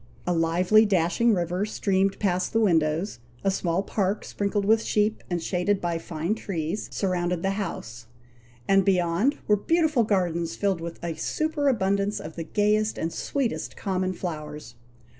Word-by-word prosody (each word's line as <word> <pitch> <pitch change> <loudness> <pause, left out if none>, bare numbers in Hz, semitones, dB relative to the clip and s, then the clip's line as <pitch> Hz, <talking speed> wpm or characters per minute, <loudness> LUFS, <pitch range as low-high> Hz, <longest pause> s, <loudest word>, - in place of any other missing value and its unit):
A 180 - +1
lively, 175 +6 +4
dashing 205 +3 +2
river, 175 +2 -1
streamed 195 -2 0
past 185 -3 0
the 225 - +3
windows; 165 - +1 0.2
a 195 - +3
small 180 0 0
park, 200 0 -1
sprinkled 200 0 -1
with 220 +2 +4
sheep, 215 0 0
and 175 -1 0
shaded 185 +3 0
by 170 -2 -1
fine 165 +3 -2
trees, 190 -3 -3
surrounded 180 -2 -1
the 195 - +1
house; 120 - -5 0.6
and 195 0 +5
beyond 185 - +2
were 210 - +4
beautiful 310 - +2
gardens 175 -5 0
filled 195 -4 0
with 170 0 -6
a 170 -1 -2
superabundance 210 - 0
of 155 +1 -8
the 165 - -4
gayest 210 +4 +1
and 165 +1 -2
sweetest 275 -5 -2
common 185 -2 -1
flowers. 150 -7 -6
190 Hz, 150 wpm, -26 LUFS, 170-210 Hz, 0.6 s, and